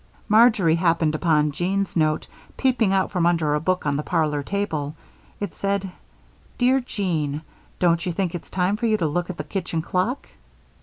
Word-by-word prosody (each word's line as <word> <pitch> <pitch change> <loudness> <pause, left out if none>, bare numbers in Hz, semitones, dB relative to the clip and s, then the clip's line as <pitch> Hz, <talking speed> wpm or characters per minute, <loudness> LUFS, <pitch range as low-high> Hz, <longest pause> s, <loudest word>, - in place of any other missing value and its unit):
Marjory 215 -6 +5
happened 165 -2 +2
upon 155 -2 +2
Jean's 190 +6 -1
note 155 -2 +1 0.3
peeping 245 -6 +2
out 190 -1 +1
from 175 -3 +2
under 165 -4 +2
a 150 - +1
book 185 +1 0
on 145 -1 +1
the - - -1
parlor 150 -3 0
table. 155 -5 -3 0.4
It 205 - -4
said: 200 -1 -2 0.7
"Dear 255 +2 +3
Jean: 165 - -2 0.3
Don't 170 -2 +2
you 180 - -1
think 180 0 -2
it's 175 - -7
time 185 +2 0
for 235 +1 0
you 215 -1 +3
to 175 - -1
look 170 +4 -1
at 185 - -5
the 150 - -3
kitchen 165 -1 -3
clock?" 185 +10 -1
175 Hz, 175 wpm, -23 LUFS, 155-200 Hz, 0.7 s, Marjory